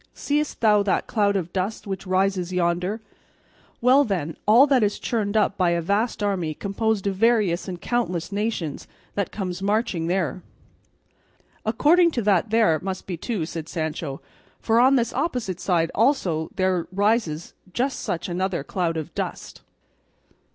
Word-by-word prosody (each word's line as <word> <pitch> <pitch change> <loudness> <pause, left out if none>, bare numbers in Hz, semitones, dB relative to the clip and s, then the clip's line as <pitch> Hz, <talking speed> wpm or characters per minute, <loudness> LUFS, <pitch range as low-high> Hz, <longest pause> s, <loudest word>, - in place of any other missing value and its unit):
Seest 295 +1 -1
thou 210 -2 +5
that 200 -1 0
cloud 205 -2 +1
of 180 -3 -2
dust 195 +3 -2
which 195 -1 -5
rises 185 -1 +1
yonder? 180 +4 0 0.8
Well, 255 +4 +6
then, 175 - -2
all 235 +6 +7
that 270 -4 +3
is 205 -1 +1
churned 215 -2 -1
up 205 -1 +1
by 180 -2 +3
a - - 0
vast 205 +6 0
army 180 -6 -1
composed 205 +2 -1
of 200 - +1
various 210 -5 +2
and 180 -2 -5
countless 190 -6 -2
nations 200 -7 -3 0.3
that 200 -2 -2
comes 185 -3 -4
marching 200 -5 0
there." 180 0 -1 1.3
"According 335 +10 +4
to 235 - -1
that 200 +1 +2
there 215 -8 +3
must 190 0 -4
be 185 - -4
two," 180 0 -3
said 165 -1 -6
Sancho, 155 -4 -4 0.4
"for 225 +1 +2
on 260 +3 +6
this 235 -3 +1
opposite 250 - -2
side 170 -3 +1
also 190 - +1
there 185 -2 0
rises 200 -5 0 0.2
just 260 +7 -1
such 170 - -3
another 180 -3 -2
cloud 165 +1 -2
of 160 +1 -5
dust." - - -5
195 Hz, 155 wpm, -24 LUFS, 175-225 Hz, 1.3 s, all